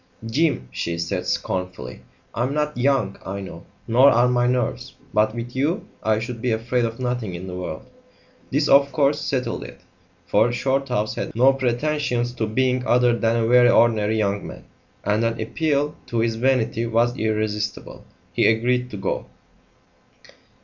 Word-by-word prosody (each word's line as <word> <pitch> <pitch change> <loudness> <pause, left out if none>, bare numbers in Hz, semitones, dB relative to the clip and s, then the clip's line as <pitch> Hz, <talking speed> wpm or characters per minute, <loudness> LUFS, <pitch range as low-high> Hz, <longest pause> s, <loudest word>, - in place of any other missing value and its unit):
"Jim," 130 - 0
she 85 0 -3
said 90 +2 -3
scornfully, 90 -9 -3 0.3
"I'm 130 +4 -1
not 150 0 -1
young, 130 -5 +1
I 100 +1 -5
know, 95 -3 -9 0.2
nor 125 +4 +6
are 120 0 +4
my 120 0 +2
nerves; 125 -1 -1 0.2
but 110 +1 +2
with 120 +1 -6
you 155 +10 -1
I 110 -1 +1
should 115 +1 -5
be 125 - 0
afraid 115 +2 0
of 115 +1 -5
nothing 125 -7 -2
in 90 +2 -7
the 90 - -7
world!" 90 -3 -6 0.6
This, 145 +2 +1
of 140 0 +5
course, 145 +2 +1
settled 130 - -2
it, - - -12 0.4
for 120 - +3
Shorthouse 125 -3 -1
had - - -5
no 130 +4 +5
pretensions 125 -1 -1
to 110 -3 -2
being 125 +3 +1
other 120 0 +4
than 115 -1 +1
a 115 -1 +1
very 120 0 +6
ordinary 110 -2 +3
young 100 -1 -1
man, - - -10 0.4
and 105 +3 +1
an 115 0 -1
appeal 145 +5 0
to 120 - -3
his 115 0 +1
vanity 115 -2 +1
was 120 +2 +1
irresistible. 110 -2 -3 0.3
He - - +3
agreed 125 +3 +1
to 105 - -7
go. 95 - -3
120 Hz, 165 wpm, -22 LUFS, 110-130 Hz, 0.6 s, nor